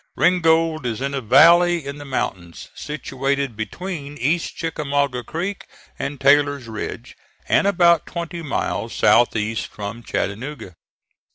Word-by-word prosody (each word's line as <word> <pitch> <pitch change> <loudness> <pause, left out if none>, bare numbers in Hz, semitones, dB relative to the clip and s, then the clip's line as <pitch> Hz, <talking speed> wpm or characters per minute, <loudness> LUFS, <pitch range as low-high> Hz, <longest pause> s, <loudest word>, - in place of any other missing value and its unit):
Ringgold 165 -5 +2
is 115 -1 -3
in 140 +1 -3
a 135 - -2
valley 170 +7 +5
in 140 +1 -6
the 145 - -9
mountains, 90 -10 -4
situated 140 -3 -3
between 145 - -6
East 155 +7 -1
Chickamauga 140 -5 -1
Creek 185 - -5 0.3
and 140 0 -4
Taylor's 140 -2 +3
Ridge, 110 -1 -6 0.3
and - - +3
about 170 -4 +4
twenty 170 0 -5
miles 150 -4 -3
south 120 +1 +4
east 110 +1 -2
from 105 +3 -7
Chattanooga. 115 -1 -4
140 Hz, 125 wpm, -21 LUFS, 125-165 Hz, 0.3 s, valley